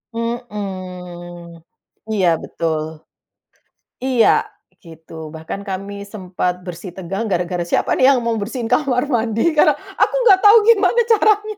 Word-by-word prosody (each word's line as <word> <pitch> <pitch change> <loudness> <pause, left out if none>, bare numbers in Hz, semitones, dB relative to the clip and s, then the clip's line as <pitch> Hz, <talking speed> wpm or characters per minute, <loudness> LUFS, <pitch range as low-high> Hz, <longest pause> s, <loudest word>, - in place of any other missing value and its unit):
Mhm. 185 -7 -6 0.5
Iya 195 -4 +1 0.2
betul. 160 -2 -2 1.2
Iya 255 -4 +3 0.5
gitu, 165 -2 -14 0.2
bahkan 160 +5 -6
kami 195 +1 -5
sempat 185 -3 -3
bersitegang 185 +3 -6
gara-gara 180 -2 -1
siapa - - 0
nih 255 - +5
yang 270 -2 +4
mau 230 -1 0
bersihin 225 +3 -4
kamar 250 -1 +2
mandi? 225 -2 0 0.2
Karna - - +5
aku - - -2
nggak 395 -5 +6
tau 415 +2 +9
gimana 435 0 +4
caranya. 425 -1 +2
200 Hz, 120 wpm, -19 LUFS, 180-250 Hz, 1.2 s, tau